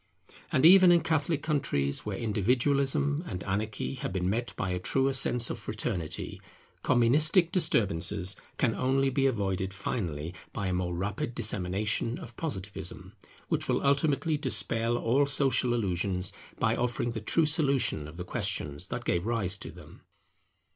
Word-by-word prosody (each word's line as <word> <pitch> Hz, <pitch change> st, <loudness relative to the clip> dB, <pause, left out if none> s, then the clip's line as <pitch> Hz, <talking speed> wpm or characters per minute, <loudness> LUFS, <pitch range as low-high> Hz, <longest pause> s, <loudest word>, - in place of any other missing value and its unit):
And 130 Hz, -, +3 dB
even 185 Hz, +1 st, +8 dB
in 170 Hz, -1 st, +5 dB
Catholic 160 Hz, -1 st, 0 dB
countries, 90 Hz, -, -1 dB
where 100 Hz, -2 st, -3 dB
individualism 135 Hz, -, +1 dB
and 90 Hz, -3 st, -5 dB
anarchy 105 Hz, +5 st, -3 dB
have 130 Hz, -, -5 dB
been 90 Hz, -1 st, -1 dB
met 115 Hz, +5 st, -1 dB
by 95 Hz, -, -2 dB
a 90 Hz, -, -2 dB
truer 135 Hz, +8 st, +1 dB
sense 125 Hz, -1 st, +3 dB
of -, -, -5 dB
fraternity, 105 Hz, -7 st, -4 dB, 0.4 s
Communistic 155 Hz, -, +5 dB
disturbances 100 Hz, -, +1 dB, 0.2 s
can 115 Hz, -4 st, +1 dB
only 135 Hz, +2 st, +1 dB
be 135 Hz, +1 st, +2 dB
avoided 100 Hz, -5 st, -2 dB
finally 85 Hz, -6 st, -4 dB, 0.2 s
by 100 Hz, -, -3 dB
a -, -, -1 dB
more 90 Hz, -1 st, -2 dB
rapid 100 Hz, +6 st, -3 dB
dissemination 105 Hz, +2 st, 0 dB
of 120 Hz, 0 st, -10 dB
Positivism, 100 Hz, -, -6 dB, 0.3 s
which -, -, -1 dB
will -, -, 0 dB
ultimately 140 Hz, +2 st, +2 dB
dispel 115 Hz, -5 st, -1 dB
all 130 Hz, +5 st, +2 dB
social 135 Hz, -3 st, +1 dB
delusions, 95 Hz, -5 st, -1 dB, 0.2 s
by -, -, +1 dB
offering 120 Hz, -1 st, -1 dB
the 115 Hz, -2 st, -5 dB
true 160 Hz, +9 st, +2 dB
solution 140 Hz, -, +2 dB
of 75 Hz, +2 st, -12 dB
the 90 Hz, -, -4 dB
questions 70 Hz, -4 st, -3 dB
that -, -, -5 dB
gave 85 Hz, +4 st, 0 dB
rise 105 Hz, -5 st, 0 dB
to -, -, -7 dB
them. -, -, -14 dB
115 Hz, 150 wpm, -29 LUFS, 95-135 Hz, 0.4 s, even